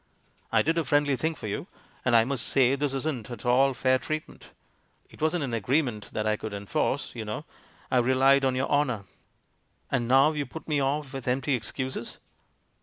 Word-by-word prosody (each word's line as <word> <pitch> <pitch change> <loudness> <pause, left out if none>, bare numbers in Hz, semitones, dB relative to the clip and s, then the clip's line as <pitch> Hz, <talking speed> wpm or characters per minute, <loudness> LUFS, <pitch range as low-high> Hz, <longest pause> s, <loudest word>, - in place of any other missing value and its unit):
I - - +4
did 165 +3 +1
a - - +1
friendly 145 -2 +2
thing 160 +5 -1
for - - -9
you, 105 - -4 0.4
and 125 -2 +3
I 115 -1 +6
must 135 -3 -1
say 130 -1 +4
this 140 0 -1
isn't 135 -5 -3
at 120 -2 -8
all 130 +2 +4
fair 130 0 +2
treatment. 155 +5 -6 0.6
It - - -16
wasn't 155 +1 +1
an 130 -4 -3
agreement 120 -1 0
that 105 - -2
I 110 0 +1
could 110 -1 -6
enforce, 100 0 -1
you 115 - -5
know 110 +8 -5 0.2
— - - -29
I 130 - +4
relied 135 +2 +4
on 130 -1 +2
your 130 +1 0
honour. 130 -8 +1 0.9
And 120 - 0
now 135 +4 +5
you 145 -3 -3
put 160 +6 -9
me 150 -2 +1
off 140 0 -1
with 135 -2 -6
empty 130 +2 +1
excuses." 125 +1 -3
130 Hz, 195 wpm, -27 LUFS, 120-145 Hz, 0.9 s, I